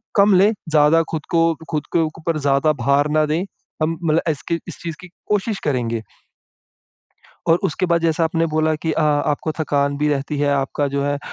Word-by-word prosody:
कम 200 Hz, 0 st, +5 dB
लें 195 Hz, +4 st, +5 dB, 0.2 s
ज़्यादा 155 Hz, +1 st, +4 dB
ख़ुद 155 Hz, -2 st, -4 dB
को 165 Hz, -1 st, +3 dB, 0.2 s
ख़ुद 150 Hz, -2 st, -2 dB
के 170 Hz, -, +3 dB, 0.2 s
ऊपर 165 Hz, 0 st, -1 dB
ज़्यादा 140 Hz, +2 st, +2 dB
भार 140 Hz, +2 st, +3 dB
ना 155 Hz, 0 st, +2 dB
दें। 155 Hz, +4 st, -1 dB, 0.4 s
हम 165 Hz, +1 st, 0 dB
मतलब 160 Hz, 0 st, +2 dB
इसकी 155 Hz, +2 st, -2 dB
इस -, -, -6 dB
चीज़ 165 Hz, -2 st, -4 dB
की 185 Hz, -, -10 dB, 0.2 s
कोशिश 210 Hz, 0 st, 0 dB
करेंगे। 120 Hz, -5 st, -1 dB, 1.5 s
और 165 Hz, +1 st, +4 dB
उसके 185 Hz, +4 st, 0 dB
बाद 170 Hz, -1 st, +1 dB
जैसा 165 Hz, 0 st, +1 dB
आपने 165 Hz, +1 st, +1 dB
बोला 155 Hz, 0 st, +2 dB
कि 160 Hz, +1 st, -3 dB
अ 160 Hz, -, 0 dB, 0.3 s
आपको 155 Hz, +2 st, -3 dB
थकान 140 Hz, -2 st, 0 dB
भी 150 Hz, +1 st, +1 dB
रहती 145 Hz, +1 st, -2 dB
है, 145 Hz, 0 st, +1 dB
आपका 140 Hz, +1 st, -1 dB
जो 140 Hz, 0 st, -2 dB
है 145 Hz, 0 st, 0 dB
अ, -, -, -6 dB
155 Hz, 195 wpm, -20 LUFS, 145-165 Hz, 1.5 s, कम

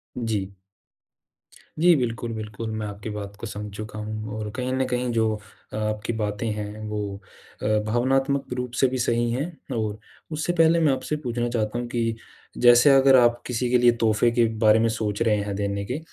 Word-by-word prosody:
जी। 105 Hz, -5 st, -2 dB, 1.3 s
जी 175 Hz, +2 st, +6 dB
बिल्कुल, 115 Hz, -3 st, -2 dB
बिल्कुल, 110 Hz, 0 st, -5 dB
मैं 110 Hz, -1 st, -3 dB
आपकी 105 Hz, +1 st, -7 dB
बात 100 Hz, -1 st, -6 dB
को 115 Hz, -, -5 dB
समझ 105 Hz, 0 st, -6 dB
चुका 110 Hz, 0 st, -7 dB
हूँ 110 Hz, 0 st, -5 dB
और 105 Hz, -1 st, -4 dB
कहीं 130 Hz, 0 st, -2 dB
न 130 Hz, 0 st, +1 dB
कहीं 125 Hz, 0 st, -1 dB
जो 110 Hz, -1 st, +1 dB, 0.4 s
अ, -, -, -4 dB
आपकी 110 Hz, +1 st, -2 dB
बातें 105 Hz, 0 st, -2 dB
हैं 105 Hz, 0 st, -6 dB
वो 105 Hz, 0 st, -3 dB, 0.6 s
अ, -, -, -2 dB, 0.2 s
भावनात्मक 135 Hz, +4 st, +1 dB
रूप 125 Hz, -1 st, -3 dB
से 135 Hz, -, +6 dB
भी 130 Hz, +1 st, -2 dB
सही 120 Hz, -1 st, +1 dB
है। 130 Hz, +5 st, -1 dB, 0.3 s
और 105 Hz, -1 st, -2 dB, 0.3 s
उससे 155 Hz, +3 st, -1 dB
पहले 165 Hz, +1 st, +5 dB
मैं 155 Hz, -4 st, +3 dB
आपसे 130 Hz, +3 st, -2 dB
पूछना 120 Hz, -1 st, -1 dB
चाहता 115 Hz, -1 st, -1 dB
हूँ 120 Hz, -, -4 dB
कि 115 Hz, -1 st, -1 dB, 0.4 s
जैसे 120 Hz, +2 st, +7 dB
अगर 135 Hz, 0 st, +6 dB
आप 120 Hz, 0 st, +3 dB
किसी 125 Hz, 0 st, -1 dB
के 125 Hz, -, +4 dB
लिए 120 Hz, 0 st, +5 dB
तोहफ़े 110 Hz, +1 st, +3 dB
के 120 Hz, 0 st, +3 dB
बारे 110 Hz, -1 st, +5 dB
में 115 Hz, -, +3 dB
सोच 110 Hz, -1 st, -2 dB
रहे 110 Hz, -2 st, +3 dB
हैं 100 Hz, -1 st, -4 dB
देने 100 Hz, 0 st, -2 dB
के, 125 Hz, +7 st, -3 dB
115 Hz, 195 wpm, -24 LUFS, 105-125 Hz, 1.3 s, जैसे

